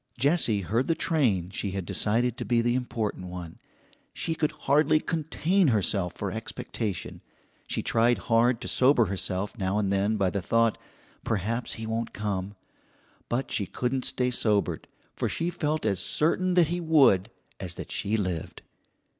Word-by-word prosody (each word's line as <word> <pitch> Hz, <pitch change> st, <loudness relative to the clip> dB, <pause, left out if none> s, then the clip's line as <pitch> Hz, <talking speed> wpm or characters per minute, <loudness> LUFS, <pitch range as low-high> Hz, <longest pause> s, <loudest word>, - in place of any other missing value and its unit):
Jessie 140 Hz, -, +3 dB
heard 115 Hz, +8 st, 0 dB
the 165 Hz, -, +2 dB
train 105 Hz, -, +1 dB
she 100 Hz, 0 st, -3 dB
had 95 Hz, -, -3 dB
decided 115 Hz, +6 st, 0 dB
to -, -, -5 dB
be 120 Hz, -1 st, +2 dB
the 120 Hz, +1 st, +2 dB
important 115 Hz, -7 st, -3 dB
one. 90 Hz, -2 st, -8 dB, 0.6 s
She 165 Hz, -, -1 dB
could 155 Hz, -1 st, 0 dB
hardly 150 Hz, +2 st, +2 dB
contain 165 Hz, +3 st, +1 dB
herself 100 Hz, -6 st, +1 dB
for -, -, -3 dB
expectation. 100 Hz, -6 st, -5 dB, 0.5 s
She -, -, -2 dB
tried 120 Hz, +1 st, +3 dB
hard 120 Hz, +1 st, +2 dB
to -, -, -5 dB
sober 130 Hz, -2 st, +4 dB
herself 95 Hz, 0 st, -2 dB
now 95 Hz, +1 st, 0 dB
and 100 Hz, -2 st, +1 dB
then 100 Hz, +3 st, +1 dB
by 95 Hz, -3 st, +1 dB
the 100 Hz, -, -2 dB
thought, 115 Hz, +2 st, +2 dB, 0.4 s
"Perhaps 115 Hz, +4 st, -2 dB
he 110 Hz, -, -6 dB
won't 115 Hz, +1 st, -3 dB
come," 100 Hz, -1 st, -3 dB, 0.7 s
but 125 Hz, +3 st, -2 dB
she 100 Hz, -, 0 dB
couldn't 130 Hz, +1 st, -1 dB
stay 125 Hz, 0 st, 0 dB
sobered, 105 Hz, -4 st, 0 dB, 0.3 s
for -, -, -1 dB
she 170 Hz, +1 st, -1 dB
felt 155 Hz, -4 st, -1 dB
as 100 Hz, -4 st, +1 dB
certain 180 Hz, +4 st, +1 dB
that 170 Hz, -4 st, +5 dB
he 175 Hz, +1 st, -1 dB
would 135 Hz, -, +4 dB, 0.3 s
as 90 Hz, -2 st, -4 dB
that -, -, -8 dB
she 105 Hz, +3 st, 0 dB
lived. 90 Hz, -6 st, -4 dB
115 Hz, 165 wpm, -27 LUFS, 100-140 Hz, 0.7 s, that